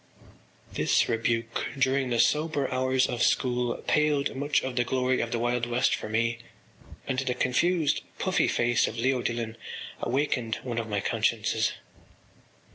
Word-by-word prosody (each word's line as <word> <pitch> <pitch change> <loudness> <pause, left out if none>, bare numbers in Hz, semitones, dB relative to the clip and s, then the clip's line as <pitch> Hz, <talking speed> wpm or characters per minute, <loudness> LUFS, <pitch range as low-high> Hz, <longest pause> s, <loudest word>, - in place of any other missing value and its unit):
” - - -28
This - - +2
rebuke 115 0 -1
during 135 0 +1
the 120 - 0
sober 150 -1 +2
hours 130 0 +2
of 120 - -3
school 125 -2 +1
paled 150 -3 +1
much 145 +2 +1
of 130 -1 -4
the 120 - +2
glory 130 +1 0
of 115 - -3
the 120 - 0
Wild 120 0 0
West 120 +1 +2
for - - -3
me 115 +1 0 0.7
and 130 -1 0
the 130 -2 -1
confused 155 +5 +1 0.2
puffy - - +1
face 120 0 +2
of - - -6
Leo 130 +2 +1
Dillon 115 -1 -3 0.4
awakened 125 -3 0
one 120 -2 -3
of 115 -1 -5
my 100 -1 -1
consciences. - - 0
125 Hz, 155 wpm, -27 LUFS, 115-135 Hz, 0.7 s, This